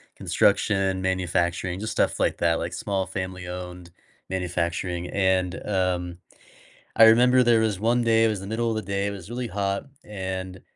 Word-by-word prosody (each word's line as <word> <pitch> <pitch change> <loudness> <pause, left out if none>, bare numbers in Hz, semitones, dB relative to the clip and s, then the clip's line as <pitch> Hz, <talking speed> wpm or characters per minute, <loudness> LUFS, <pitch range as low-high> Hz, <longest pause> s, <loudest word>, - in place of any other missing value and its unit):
construction, 95 -2 +1
manufacturing, 90 -1 -1
just 110 +2 -4
stuff - - 0
like - - +1
that, 85 -1 +2
like 85 +1 -4
small 95 0 -2
family-owned 90 -1 -6 0.4
manufacturing 90 -1 -2
and, 95 -2 +1
um, 90 -3 -1 0.8
I 115 - +8
remember 125 +3 +6
there 120 -2 +4
was 105 -4 0
one 120 +3 +2
day, 115 -1 +4
it - - +4
was 105 -3 -1
the 95 - -8
middle 115 +2 -1
of 110 - -1
the 110 - -1
day, 100 +1 -2
it - - -2
was 100 -2 -9
really 120 +1 -4
hot, 100 +2 -2 0.2
and, 95 -2 -5
95 Hz, 165 wpm, -25 LUFS, 90-110 Hz, 0.8 s, I